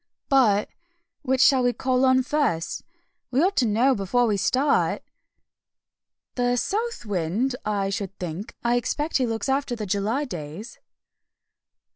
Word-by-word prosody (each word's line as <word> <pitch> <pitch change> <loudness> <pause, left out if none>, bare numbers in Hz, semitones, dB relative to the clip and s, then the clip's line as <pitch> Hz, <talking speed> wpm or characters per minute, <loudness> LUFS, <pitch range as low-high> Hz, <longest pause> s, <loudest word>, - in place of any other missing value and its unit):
"But 225 -8 +4 0.5
which 265 -2 +1
shall 270 -2 +5
we 245 0 +2
call 255 +1 +1
on 260 0 +4
first? 260 - -1 0.5
We 255 +1 0
ought 390 +2 +1
to 245 - +3
know 235 +6 +3
before 240 +4 +1
we 215 -3 +1
start." 265 +8 +1 1.3
"The 245 0 +1
South 440 - -2
Wind, 205 +7 -1
I 200 -2 -1
should 195 -1 -4
think; 180 +6 -6
I 240 +1 +2
expect 295 +6 -1
he 255 -2 0
looks 225 0 -3
after 270 -2 0
the 215 -2 -5
July 210 +9 -1
days." 170 - -8
245 Hz, 140 wpm, -24 LUFS, 205-265 Hz, 1.3 s, shall